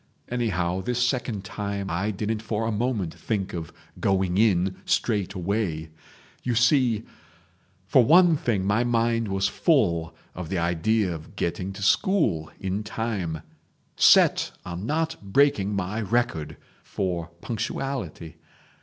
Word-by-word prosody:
Anyhow, 95 -7 -1
this 125 +4 +1
second 120 -6 -2
time 100 -1 -4
I 95 +5 -1
didn't 105 +1 -2
for 110 0 -2
a 115 - 0
moment 105 -6 -1
think 100 -4 -3
of 80 -3 -5 0.3
going 95 -2 +1
in 95 -4 +2
straight 100 -4 0
away. 90 -4 -2 0.5
You 120 -2 -1
see... 120 -2 +3 0.8
For 125 +6 +5
one 170 +5 +6
thing 110 -9 -1
my 105 +4 +2
mind 115 -1 +1
was 95 0 +1
full 85 - +1 0.2
of 90 -2 -6
the 95 - -1
idea 90 +4 +1
of 80 -1 -10
getting 90 +3 -2
to 100 - -7
school 100 - +2
in 95 +2 -2
time—set 105 -8 +1
on 90 +4 -5
not 160 +2 0
breaking 105 -1 +2
my 100 +3 -2
record 110 -7 -1 0.2
for 85 -4 -3
punctuality. 110 - -4
100 Hz, 130 wpm, -25 LUFS, 90-115 Hz, 0.8 s, one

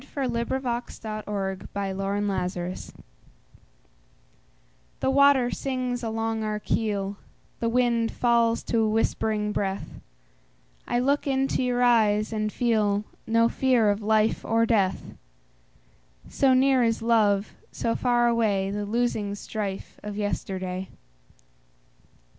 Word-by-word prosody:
By 275 -2 0
SophieJewett 235 -1 -2 0.8
1502 195 -1 -3
Armistice 190 -3 -2 2.1
THE 265 - +1
WATER 275 -3 +5
sings 255 -2 -2
along 225 -1 -2
our 215 0 -2
keel, 205 -2 -1 0.4
The 230 - 0
wind 235 -1 +1
falls 235 -1 +2
to 230 - 0
a 220 -1 +2
whispering 215 -1 0
breath;I - - -6
look 280 +4 +1
into 270 -1 +1
your 250 -1 +1
eyes 215 -3 +3
and 215 -1 -1
feelNo 225 0 0
fear 245 -5 +3
of 205 +1 -3
life 215 +1 +2
or 230 +1 +2
death; 200 -5 0 1.1
So 265 -2 +3
near 265 0 +4
is 225 -1 +1
love, 215 -3 +2 0.2
so 230 - -1
far 240 -1 +2
awayThe 205 -3 0
losing 220 -3 -1
strife 205 -2 -5
of 205 -1 -6
yesterday. 190 -2 -3
220 Hz, 105 wpm, -26 LUFS, 200-240 Hz, 2.1 s, WATER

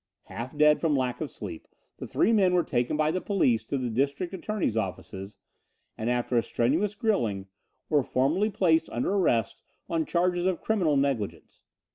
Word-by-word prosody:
Half 125 +5 -7
dead 150 0 +5
from 160 -3 +2
lack 125 -2 -1
of 155 - -2
sleep, 90 -6 -8 0.3
the - - -6
three 230 - +2
men 190 -4 +4
were 175 - +3
taken 120 +2 -1
by 155 0 +2
the 185 +2 -2
police 125 - +1
to 140 - -2
the 125 -3 -2
district 140 - -1
attorney's 190 - -2
offices 95 -1 -5 0.6
and, 110 +2 -3
after 120 0 0
a - - +5
strenuous 160 - 0
grilling, 115 - 0 0.4
were 150 -2 +3
formally 155 +12 +1
placed 170 -6 +2
under 120 - -1
arrest 120 - +1 0.3
on 165 -1 -1
charges 175 +1 +1
of 185 -2 0
criminal 180 -10 +2
negligence. 135 -7 -2
150 Hz, 170 wpm, -27 LUFS, 120-180 Hz, 0.6 s, dead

